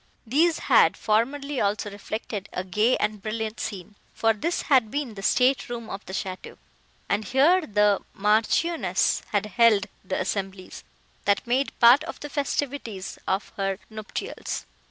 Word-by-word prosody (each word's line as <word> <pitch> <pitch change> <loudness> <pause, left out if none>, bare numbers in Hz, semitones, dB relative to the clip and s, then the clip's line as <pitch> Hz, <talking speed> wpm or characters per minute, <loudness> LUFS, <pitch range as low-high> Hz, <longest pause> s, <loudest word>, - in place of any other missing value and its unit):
These 315 +8 +3
had - - +4
formerly 270 +6 0
also 205 0 -1
reflected 205 0 -5
a 180 - -2
gay 210 +7 +2
and 210 -1 -2
brilliant 220 +1 -4
scene, 195 -1 -5 0.2
for 225 0 +3
this 330 +11 -2
had 255 -7 +3
been 280 -2 -3
the 195 - -8
state 255 +7 +2
room 235 -2 -6
of 195 - -6
the 190 - -7
château, 185 -1 -5 0.5
and 205 +2 0
here 285 - +4
the 210 -1 +3
Marchioness 220 +11 +1
had - - 0
held 215 -1 +4 0.2
the 185 0 -2
assemblies, 190 0 -4 0.4
that 200 -1 +2
made 255 +3 0
part 245 +5 +7
of - - -7
the 295 - -8
festivities 275 -8 -3
of 190 +2 -1
her 195 -1 -1
nuptials. 215 -1 -5
220 Hz, 150 wpm, -25 LUFS, 200-265 Hz, 0.5 s, part